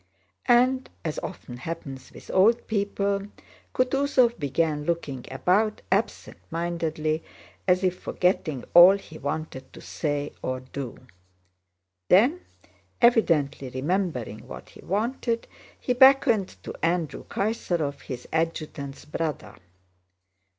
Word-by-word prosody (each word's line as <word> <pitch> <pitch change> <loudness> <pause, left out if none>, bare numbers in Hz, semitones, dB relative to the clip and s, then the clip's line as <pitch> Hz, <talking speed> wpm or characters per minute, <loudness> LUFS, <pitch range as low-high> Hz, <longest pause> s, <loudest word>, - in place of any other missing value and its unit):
And 255 +2 +4 0.2
as 155 - -2
often 120 - -8
happens 135 -2 -7
with - - -11
old 220 +5 +4
people, 200 -1 -1 0.5
Kutúzov 255 -2 +2
began 150 +1 0
looking 150 -6 -3
about 210 +4 +1
absent 200 +4 -1
mindedly 160 -2 -2 0.4
as 180 0 +3
if 185 -1 0
forgetting 165 -7 0
all 180 +3 +9
he 160 -5 -12
wanted 145 -3 -5
to - - -11
say 145 -2 -3
or 130 0 -3
do. 130 -1 -7 1.0
Then, 250 - +5 0.6
evidently 165 - +3
remembering 130 - -2
what - - -10
he - - -16
wanted, 230 +3 -1 0.3
he 250 - 0
beckoned 250 -6 +5 0.2
to - - -6
Andrew 165 -2 0
Kaysárov, 175 -9 -2
his 125 -2 -7
adjutant's 155 -4 -3
brother. 155 0 -4
170 Hz, 110 wpm, -26 LUFS, 145-210 Hz, 1.0 s, all